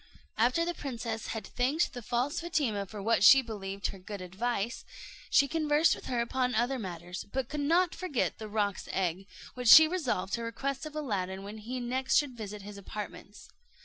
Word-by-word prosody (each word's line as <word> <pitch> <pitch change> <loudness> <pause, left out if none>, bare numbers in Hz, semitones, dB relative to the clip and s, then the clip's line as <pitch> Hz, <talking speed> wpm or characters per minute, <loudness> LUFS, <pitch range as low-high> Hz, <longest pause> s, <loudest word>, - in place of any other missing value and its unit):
After 250 +9 +2
the 345 - -1
princess 235 -7 -5
had 225 - -4
thanked 270 +7 0
the 245 - -6
false 245 +5 -1
Fatima 270 - -1
for 205 0 -8
what 225 -1 +2
she 265 +8 +9
believed 200 -3 -6
her 195 - -9
good 200 +2 -7
advice, 200 +5 -3 0.5
she 280 - +5
conversed 310 0 +3
with - - -8
her 245 -2 0
upon 250 +1 0
other 245 +4 +1
matters; 175 -2 -6
but 265 -2 -2
could 300 - -4
not 335 +4 +3
forget 330 -10 -2
the 215 - -6
roc's 205 -2 -1
egg, 190 +1 -1 0.3
which 250 -1 -4
she 315 +7 +11
resolved 280 - -2
to 235 - 0
request 270 +5 -3
of 305 - -11
Aladdin 195 -10 -3
when 210 +2 -8 0.3
next 260 +1 0
he - - +8
should 290 -3 +2
visit 210 -2 -7
his 205 0 -9
apartments. 205 +1 -8
235 Hz, 185 wpm, -30 LUFS, 200-275 Hz, 0.5 s, she